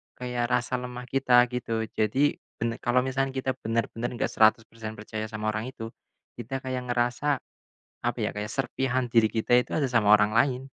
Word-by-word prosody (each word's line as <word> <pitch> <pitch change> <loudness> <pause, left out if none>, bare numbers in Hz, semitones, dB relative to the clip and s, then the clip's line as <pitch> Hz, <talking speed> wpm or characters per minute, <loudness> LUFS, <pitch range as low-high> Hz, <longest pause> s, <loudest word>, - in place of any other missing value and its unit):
kayak 125 -1 -2
rasa 125 +1 0
lemah 125 0 -6
kita 125 -2 +5
gitu 115 -2 -2
jadi, 130 +7 +1 0.2
ben 115 0 -2
kalau 125 +1 +2
misalkan 135 0 -1
kita 130 0 0
bener-bener 115 +1 -2
gak - - -1
100% 110 0 +2
percaya 110 0 -5
sama 110 0 -2
orang 110 +3 -3
itu, 115 0 -7 0.5
kita 135 +3 -5
kayak 130 -1 -3
ngerasa, 120 +4 +1 0.6
apa - - -2
ya - - 0
kayak 105 0 -4
serpihan 130 -1 -1
diri 115 -2 +5
kita 115 +2 +3
itu - - -3
ada 140 -4 +1
sama 105 -3 +6
orang 105 0 +2
lain, 125 +2 +2
120 Hz, 175 wpm, -27 LUFS, 110-130 Hz, 0.6 s, sama